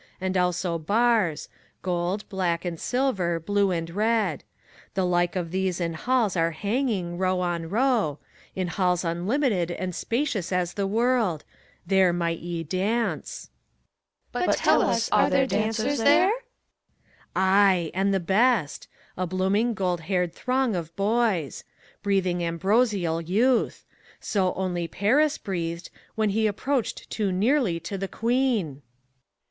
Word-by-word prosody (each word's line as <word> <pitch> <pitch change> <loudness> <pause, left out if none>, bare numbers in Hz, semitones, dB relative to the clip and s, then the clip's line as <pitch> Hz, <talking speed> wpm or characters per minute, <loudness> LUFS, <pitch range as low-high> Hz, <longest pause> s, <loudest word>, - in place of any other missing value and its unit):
And 190 0 -2
also 180 -1 0
bars 210 -2 +1 0.2
— - - -37
gold, 180 +3 -2
black 180 -3 -1
and 170 -2 -4
silver, 200 -10 0
blue 200 +3 +1
and 165 -2 -2
red. 210 - 0 0.5
The 190 -1 +1
like 175 0 +1
of 175 -3 -3
these 185 -1 -1
in 170 -1 -1
halls 230 +2 0
are 165 -1 +2
hanging, 200 - -2
row 185 -1 +1
on 170 -2 -2
row, 225 - +1 0.2
— - - -28
In 185 -1 -1
halls 180 0 0
unlimited 180 - 0
and 180 +1 -4
spacious 230 - -2
as 180 -1 0
the 200 -1 -1
world: 225 - +1 0.4
There 190 0 +4
might 170 -1 -1
ye 170 -1 -4
dance! 195 +8 -2 0.8
CHORUS. - - 0
But - - +2
tell - - +4
us, - - +1
are - - +4
there 270 - +3
dancers 225 +3 0
there 290 - +5
t - - +2
PHORKYAS. - - -6 0.9
Ay, 190 -3 +3
and 195 +2 +1
the 195 - +2
best! 195 - +1 0.2
— - - -31
a 185 0 -2
blooming, 195 +6 +1
gold 180 -4 -1
haired 180 0 -1
throng 255 -1 0
of 165 -1 -5
boys. 200 - 0 0.4
Breathing 185 -3 0
ambrosial 185 -1 +1
youth 225 +9 +1
I - - -38 0.3
So 190 -3 0
only 175 -2 -2
Paris 275 - +2
breathed. 170 -2 -4 0.2
When 215 -2 +1
he 220 +2 +2
approached 250 +4 -2
too 205 -3 -1
nearly 205 - +1
to 195 +4 -5
the 195 - -2
Queen. 240 -1 +1
HELENA. 140 -2 -11
190 Hz, 150 wpm, -25 LUFS, 175-225 Hz, 0.9 s, there